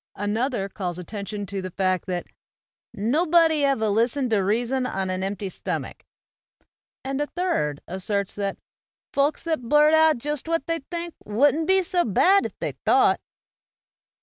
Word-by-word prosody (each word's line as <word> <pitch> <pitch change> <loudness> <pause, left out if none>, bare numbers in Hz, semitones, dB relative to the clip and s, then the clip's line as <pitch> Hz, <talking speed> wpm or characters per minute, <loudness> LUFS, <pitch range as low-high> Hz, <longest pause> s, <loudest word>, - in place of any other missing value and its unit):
Another 205 +1 -1
calls 180 -3 -5
attention 205 +2 -5
to 195 0 -4
the 185 - -5
fact 185 0 -1
that 180 -1 -2 0.7
"nobuddy 315 - +3
ever 270 -6 +2
listened 235 +5 +1
t' 220 - +4
reason 240 +6 0
on 190 -3 -2
an 185 0 -2
empty 195 +1 -3
stomach." 185 - -5 1.0
And 270 +1 -2
a 295 - -1
third 290 - -1
asserts 195 +2 -2
that 200 -1 -3 0.6
"folks 280 +2 +1
that 320 -4 -1
blurt 300 +1 +5
out 315 -2 +5
jist 295 +4 -4
what 330 -4 0
they 330 0 -1
think 340 -1 -4
wouldn't 285 +9 +2
be 380 0 +4
so 350 0 +1
bad 375 - +4
if - - -18
they - - -2
thought." - - +4
235 Hz, 150 wpm, -24 LUFS, 195-310 Hz, 1.0 s, blurt